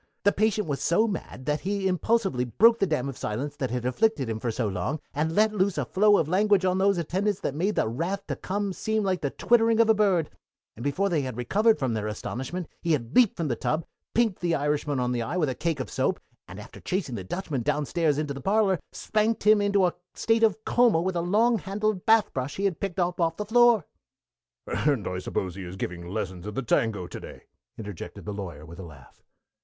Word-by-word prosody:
The 205 Hz, -, +5 dB
patient 210 Hz, -1 st, +1 dB
was 140 Hz, -2 st, -2 dB
so 215 Hz, +7 st, +3 dB
mad 165 Hz, -, -6 dB
that 150 Hz, +1 st, 0 dB
he 195 Hz, 0 st, -1 dB
impulsively 190 Hz, -, +1 dB
broke 225 Hz, -, +4 dB
the 195 Hz, -, +2 dB
dam 150 Hz, -5 st, -1 dB
of 135 Hz, -, -6 dB
silence 135 Hz, +8 st, -3 dB
that 130 Hz, -3 st, -2 dB
had 125 Hz, +1 st, -3 dB
afflicted 140 Hz, -, +1 dB
him 110 Hz, -, -3 dB
for 120 Hz, -, -2 dB
so 115 Hz, 0 st, -1 dB
long 100 Hz, -, -2 dB
and 160 Hz, +3 st, -1 dB
let 215 Hz, +1 st, +3 dB
loose 195 Hz, -2 st, +1 dB
a -, -, 0 dB
flow 205 Hz, +1 st, +4 dB
of 160 Hz, -, +1 dB
language 195 Hz, +2 st, +3 dB
on 185 Hz, 0 st, +1 dB
those 195 Hz, 0 st, +3 dB
attendants 190 Hz, +4 st, -1 dB
that -, -, -2 dB
made 185 Hz, +8 st, -1 dB
the -, -, +1 dB
wrath 170 Hz, -, -3 dB
to -, -, -3 dB
come 200 Hz, 0 st, -3 dB
seem 220 Hz, +3 st, -1 dB
like 190 Hz, -2 st, 0 dB
the 140 Hz, -, 0 dB
twittering 230 Hz, -, +3 dB
of 225 Hz, -1 st, +6 dB
a -, -, +6 dB
bird; 195 Hz, -7 st, +2 dB, 0.4 s
and 120 Hz, -, -8 dB
before 145 Hz, +8 st, 0 dB
they 170 Hz, -6 st, +1 dB
had 130 Hz, -3 st, -5 dB
recovered 210 Hz, -, +2 dB
from 130 Hz, -4 st, -1 dB
their 105 Hz, -1 st, -2 dB
astonishment 130 Hz, +10 st, -5 dB
he 170 Hz, -2 st, +1 dB
had 120 Hz, -5 st, -3 dB
leaped 245 Hz, -5 st, +5 dB
from 165 Hz, -, -1 dB
the 120 Hz, -, 0 dB
tub, 155 Hz, +7 st, -1 dB, 0.3 s
pinked 225 Hz, -5 st, +2 dB
the 170 Hz, -2 st, +1 dB
Irishman 145 Hz, -1 st, -1 dB
on 125 Hz, 0 st, 0 dB
the 120 Hz, -1 st, -1 dB
eye 145 Hz, +10 st, -3 dB
with 155 Hz, -6 st, +1 dB
a -, -, -1 dB
cake 160 Hz, +2 st, -2 dB
of 130 Hz, -, -3 dB
soap, -, -, 0 dB, 0.3 s
and, -, -, -9 dB
after -, -, -11 dB
chasing 180 Hz, -8 st, -3 dB
the 100 Hz, -5 st, -4 dB
Dutchman 150 Hz, -, -3 dB
downstairs 150 Hz, +4 st, 0 dB
into 150 Hz, -2 st, -2 dB
the 140 Hz, -, -8 dB
parlor, 195 Hz, +1 st, +2 dB
spanked 220 Hz, +1 st, 0 dB
him 210 Hz, 0 st, +5 dB
into 200 Hz, -2 st, +3 dB
a 175 Hz, -, +1 dB, 0.2 s
state 225 Hz, 0 st, +1 dB
of 220 Hz, -1 st, +2 dB
coma 240 Hz, -8 st, +4 dB
with 185 Hz, +2 st, -1 dB
a 170 Hz, -, 0 dB
long 220 Hz, +6 st, +2 dB
handled 200 Hz, 0 st, -2 dB
bath 220 Hz, -1 st, +4 dB
brush 130 Hz, +1 st, -3 dB
he 200 Hz, -, -2 dB
had 190 Hz, -4 st, 0 dB
picked 195 Hz, -2 st, -3 dB
up 175 Hz, 0 st, 0 dB
off 165 Hz, -1 st, +1 dB
the 210 Hz, -, -3 dB
floor." 235 Hz, -4 st, +5 dB, 0.8 s
"And 140 Hz, -9 st, 0 dB
I 90 Hz, 0 st, -3 dB
suppose 95 Hz, 0 st, -3 dB
he 95 Hz, -, -8 dB
is 90 Hz, +1 st, -7 dB
giving 85 Hz, -2 st, -5 dB
lessons 95 Hz, -1 st, -4 dB
in 105 Hz, -, -6 dB
the 135 Hz, -, -2 dB
tango 110 Hz, -5 st, 0 dB
to -, -, -8 dB
day!" -, -, -11 dB, 0.3 s
interjected 105 Hz, -5 st, -8 dB
the 105 Hz, -, -4 dB
Lawyer, 85 Hz, -7 st, -7 dB
with 85 Hz, +2 st, -12 dB
a -, -, -6 dB
laugh. 75 Hz, -6 st, -14 dB
170 Hz, 235 wpm, -26 LUFS, 125-205 Hz, 0.8 s, of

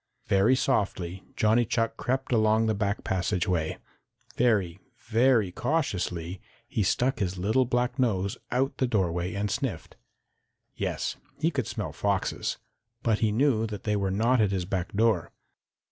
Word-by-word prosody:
Very 100 Hz, +7 st, +4 dB
softly 95 Hz, -8 st, -1 dB
Johnny 110 Hz, +3 st, +3 dB
Chuck 115 Hz, 0 st, 0 dB
crept 130 Hz, +1 st, -2 dB
along 110 Hz, -1 st, +3 dB
the 110 Hz, -, +2 dB
back 100 Hz, 0 st, -1 dB
passageway. 90 Hz, -3 st, 0 dB, 0.6 s
Very, 100 Hz, -7 st, +2 dB, 0.2 s
very 115 Hz, -3 st, +2 dB
cautiously 90 Hz, -, -2 dB, 0.3 s
he -, -, -1 dB
stuck 125 Hz, +7 st, +1 dB
his 95 Hz, -2 st, -1 dB
little 110 Hz, +8 st, +2 dB
black 125 Hz, +2 st, 0 dB
nose 100 Hz, -6 st, +1 dB
out 130 Hz, +2 st, 0 dB
the 130 Hz, -, +2 dB
doorway 90 Hz, -5 st, 0 dB
and 100 Hz, 0 st, -1 dB
sniffed. -, -, -3 dB, 0.8 s
Yes, -, -, -2 dB, 0.2 s
he 160 Hz, +3 st, +1 dB
could 130 Hz, -7 st, -2 dB
smell 110 Hz, -3 st, -4 dB
foxes, 100 Hz, -1 st, -1 dB, 0.5 s
but 110 Hz, -2 st, +2 dB
he 110 Hz, -2 st, +2 dB
knew 115 Hz, -1 st, +2 dB
that 105 Hz, -2 st, -7 dB
they 105 Hz, -1 st, 0 dB
were 100 Hz, -1 st, 0 dB
not 115 Hz, +5 st, +2 dB
at 105 Hz, -, +3 dB
his 95 Hz, -2 st, -1 dB
back 95 Hz, -1 st, -2 dB
door. 110 Hz, -4 st, +2 dB
105 Hz, 145 wpm, -27 LUFS, 95-120 Hz, 0.8 s, Very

